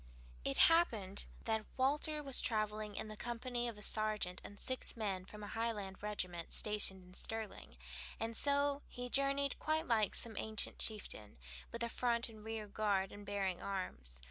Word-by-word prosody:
It 135 - +1
happened 225 - +5 0.2
that 220 -1 0
Walter 295 +3 +2
was 275 -2 +5
traveling 215 -2 0
in - - -3
the 215 - -6
company 240 +2 -2
of 230 -3 -4
a 210 - -4
sergeant 215 -4 0
and 205 - -9
six 255 -2 -1
men 195 -4 -1
from 210 +2 -9
a - - -5
Highland 210 -4 -2
regiment 185 -5 -2
stationed 205 -3 +2
in 180 0 -15
Sterling, 220 - -3 0.4
and 225 0 -2
so 285 +2 +3
he 245 0 -5
journeyed 275 +1 +3
quite 315 +1 +1
like 220 -4 +3
some 230 -2 +2
ancient 220 -1 -2
chieftain, 150 - -2 0.3
with 235 0 -3
a - - +1
front 235 0 +1
and 215 -2 -12
rear 220 -1 -3
guard, 200 -2 +1
and 205 0 -10
bearing 195 -3 0
arms. 65 - -4
215 Hz, 170 wpm, -38 LUFS, 200-240 Hz, 0.4 s, happened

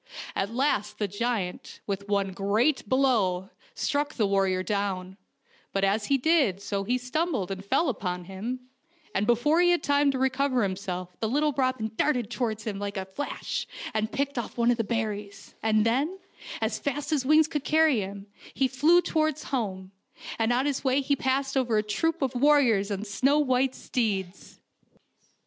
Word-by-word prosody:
At 195 - -1
last 210 -5 0
the 210 - -1
giant, 205 -2 -3
with 200 0 -4
one 200 -1 +1
great 205 +7 +1
blow, 215 -8 +2 0.2
struck 290 0 -1
the 220 - +2
war 195 -1 +2
rior 185 0 -1
down, 195 -3 -2 0.6
but 195 - 0
as 205 +2 +1
he 275 - +3
did 270 - +2
so 200 0 -3
he 245 +5 +1
stumbled 255 - -1
and 190 0 -5
fell 315 +11 +1
upon 180 -8 -2
him, 205 +8 -5 0.5
and 200 +2 0
before 295 +8 +3
he 350 - +5
had 350 -3 +2
time 285 0 +3
to 270 - 0
recover 260 -1 +1
him 190 -2 0
self 180 -2 -6
the 220 - -1
little 295 +4 +1
robin 255 -5 0
darted 245 -7 +1
towards 220 -4 -2
him 205 -3 -4
like 200 0 -4
a 190 - -3
flash 190 +10 -4 0.3
and 220 0 -1
picked 280 -2 -1
off 240 - -6
one 235 0 +3
of 240 - +1
the 230 - 0
berries, 210 -2 -4
and 215 -1 +2
then, 280 +11 +1 0.4
as 220 0 -1
fast 290 +1 -3
as 295 -4 +1
wings 310 +3 +5
could 295 -3 -3
carry 310 -5 +4
him, 200 0 -6 0.3
he 265 - +2
flew 310 +7 +4
towards 310 -2 0
home, 195 -8 -3 0.5
and 225 +1 +2
on 250 +3 +2
his 285 -2 -1
way 265 +1 +2
he 280 +1 +1
passed 270 +1 -1
over 245 -4 +2
a 210 - +2
troop 325 +9 -1
of 265 -1 -1
warriors 250 -7 +4
on 200 0 -3
snow 265 +7 +2
white 260 -2 +2
steeds. 195 -6 -3
235 Hz, 180 wpm, -27 LUFS, 200-275 Hz, 0.6 s, he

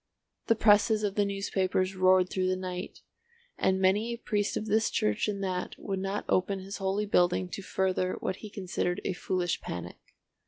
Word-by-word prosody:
The 230 - +4
presses 215 0 +4
of 205 -2 0
the 205 0 +2
newspapers 195 -1 -1
roared 185 0 +4
through 185 -1 0
the 185 - +1
night, 185 -1 -6 0.5
and 190 0 +1
many 205 +5 +2
a - - -12
priest 210 -3 -1
of 215 - -3
this 220 +1 +2
church 105 - 0
and 200 -1 -2
that 185 -1 -3
would 195 -1 -3
not 195 +2 -3
open 195 +2 +1
his 195 +1 -7
holy 195 +1 -1
building 180 -2 +2
to 195 - -6
further 185 -1 0
what 185 - -3
he 215 - -9
considered 185 -1 -2
a 190 - 0
foolish 180 -1 -1
panic. 90 0 -6
190 Hz, 185 wpm, -29 LUFS, 185-205 Hz, 0.5 s, The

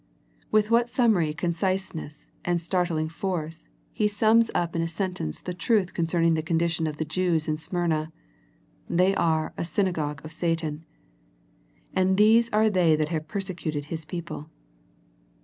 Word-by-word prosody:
With 215 +1 +2
what 235 +1 +4
summary 220 -11 +3
conciseness 170 -2 -3
and 175 -1 +1
start 180 +1 0
ling 155 -1 -1
force 165 -2 -4 0.3
He 210 - +2
sums 220 +2 +3
up 170 -1 0
in 165 - +1
a 165 - 0
sentence 175 - -3
the 180 - -4
truth 185 +1 +1
concerning 165 0 +2
the 160 - +1
condition 165 0 0
of 150 -1 -4
the 160 - -2
Jews 165 0 0
in 155 0 -1
Smyrna. 160 -2 -1 0.8
They 185 +3 +3
are 160 -4 +1
" - - -31
a - - 0
synagogue 165 -4 -1
of 155 - -8
Satan," 165 -2 -2 1.1
and 190 0 +2
these 225 +3 +5
are 215 0 +3
they 180 -6 +4
that 155 0 -1
have 155 -2 -3
persecuted 175 -7 -3
His 160 -1 -4
people. 165 -2 -6
170 Hz, 155 wpm, -26 LUFS, 160-190 Hz, 1.1 s, these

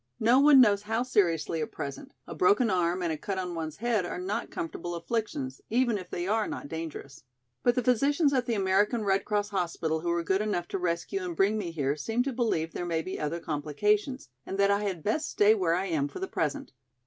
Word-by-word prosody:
No 235 +4 +5
one 285 -1 +7
knows 205 -5 +5
how 225 +3 -1
seriously 170 -9 +1
at 155 - -4
present, 140 -1 -7
a - - -7
broken 210 +5 +3
arm 180 0 +1
and 165 -2 0
a - - -4
cut 195 -2 -3
on 180 -2 -3
one's 160 -2 -5
head 230 -3 +1
are 175 - -4
not 195 +5 -3
comfortable 170 +1 -5
afflictions, 170 - -3
even 240 0 +2
if 180 -1 -10
they 175 +1 -3
are 215 +1 +1
not - - -6
dangerous. 160 -3 -7 0.4
But 245 -1 +3
the 250 - +1
physicians 280 +5 +3
at 255 -2 +1
the 235 - +1
American 205 +4 +2
Red 195 -1 +1
Cross 205 -1 0
hospital 170 -5 -1
who 170 +2 -3
were 170 0 0
good 190 +4 +1
enough 205 -5 -1
to 195 - -2
rescue 180 +2 -2
and 175 -2 -4
bring 195 +5 +3
me 205 -5 -2
here 145 -4 -1
seem 225 +11 -1
to 270 0 -3
believe 215 -10 -1
there - - -4
may 165 -2 -1
be 185 - -5
other 155 +3 -2
complications 205 - -1
and 195 - -5
that 200 0 +4
I 200 +1 +2
had 180 -6 -3
best 300 +9 0
stay 210 +1 +5
where 180 -6 +1
I 185 +2 -1
am 155 -6 0
for - - -9
the 380 - -3
present. 285 -6 -2
195 Hz, 230 wpm, -28 LUFS, 170-225 Hz, 0.4 s, one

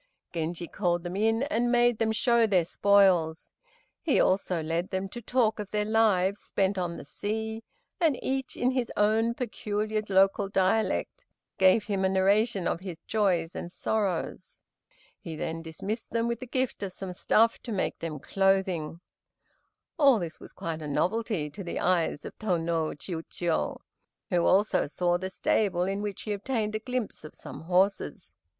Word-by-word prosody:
Genji 170 +1 -3
called 175 -2 -1
them 175 +1 -5
in 225 +4 +2
and 240 -5 0
made 240 -2 +3
them 225 -1 +2
show 235 0 +3
their 185 -5 +3
spoils. 185 -5 +3 0.5
He 310 - +2
also 185 -3 +1
led 165 +3 -1
them 190 +1 -2
to 240 - -8
talk 230 -2 +1
of 205 -2 -5
their 210 0 0
lives 210 -3 +2
spent 195 0 0
on 175 -2 -2
the - - -9
sea, 220 +2 -4 0.4
and 320 -7 +3
each 265 -1 -2
in 250 +1 +2
his 255 -2 -1
own 220 +3 +3
peculiar 215 -3 -2
local 195 +1 +3
dialect 195 +3 0 0.3
gave 190 +3 +5
him 200 -3 -1
a 190 - +3
narration 195 +1 +2
of - - -1
his 185 -3 -7
joys 180 -6 +1
and 175 - -5
sorrows. 195 -4 -2 0.6
He 165 - -7
then 165 +1 -4
dismissed 190 +8 -5
them 230 0 0
with 235 -1 -2
the 255 - -7
gift 255 -1 -1
of 195 -2 -3
some 185 0 -6
stuff 225 +5 +3
to 240 - -7
make 195 -3 -1
them 160 -2 -4
clothing. 185 -2 0 1.0
All 275 -5 +6
this 170 -4 -5
was - - -12
quite 160 -1 -5
a 150 - -5
novelty 185 +2 0
to 195 +5 -7
the 175 - -4
eyes 175 -5 +1
of - - -8
Tô 185 -6 +1
no 165 -1 0
Chiûjiô, 165 +1 -3 0.5
who 175 -2 +2
also 200 -4 +3
saw 175 +3 0
the 190 +1 -4
stable 190 -2 +1
in 195 +2 -1
which 205 -2 -4
he 210 - -2
obtained 215 0 -2
a 215 - -1
glimpse 250 -4 -4
of 155 - -10
some - - -9
horses. 185 +3 0
195 Hz, 170 wpm, -28 LUFS, 175-220 Hz, 1.0 s, All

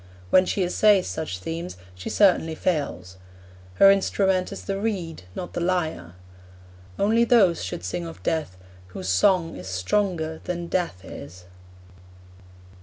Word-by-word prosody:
When 185 0 +5
she 195 - 0
essays 195 +2 +4
such 155 -13 -4
themes, 165 - -6 0.2
she 90 +1 -7
certainly 175 -5 +3
fails. 140 - -2 0.6
Her 195 - +8
instrument 190 -1 +1
is 200 - -7
the 195 -1 -3
reed, 180 - -3
not 175 - -6
the - - -2
lyre. 160 - -2 0.8
Only 225 +3 +3
those 210 -8 +4
should 95 -2 -5
sing 90 -2 -3
of 85 +2 -11
Death 150 - -2 0.3
whose 95 0 -6
song 165 - +3
is 90 +1 -9
stronger 160 - -1
than 175 -1 -3
Death 170 - -2
is. 90 0 -10
170 Hz, 135 wpm, -24 LUFS, -, 0.8 s, Her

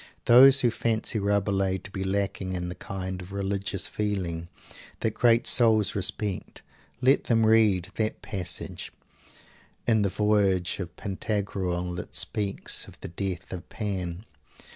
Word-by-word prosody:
Those 135 +3 +8
who 120 - +3
fancy 115 0 0
Rabelais 100 -1 +1
to 100 - -6
be 95 -1 -4
lacking 95 -1 -2
in 90 -1 -3
the - - -4
kind 95 -1 -6
of 90 +1 -10
religious 100 -1 -2
feeling 90 -6 -3 0.5
that 110 - 0
great 115 -1 +3
souls 110 -4 +5
respect, 100 0 -3 0.4
let 130 +2 +3
them 115 -2 +3
read 105 -5 +4
that 110 -1 -2
passage 90 -4 -4 0.9
in 110 -2 +3
the 100 - +1
voyage 100 -3 +1
of 85 -2 -6
Pantagruel 95 -3 -2
that 90 - -7
speaks 105 -3 -1
of - - -15
the - - -6
Death 95 +1 -4
of 90 - -8
Pan. 95 -2 -4
100 Hz, 140 wpm, -27 LUFS, 95-110 Hz, 0.9 s, Those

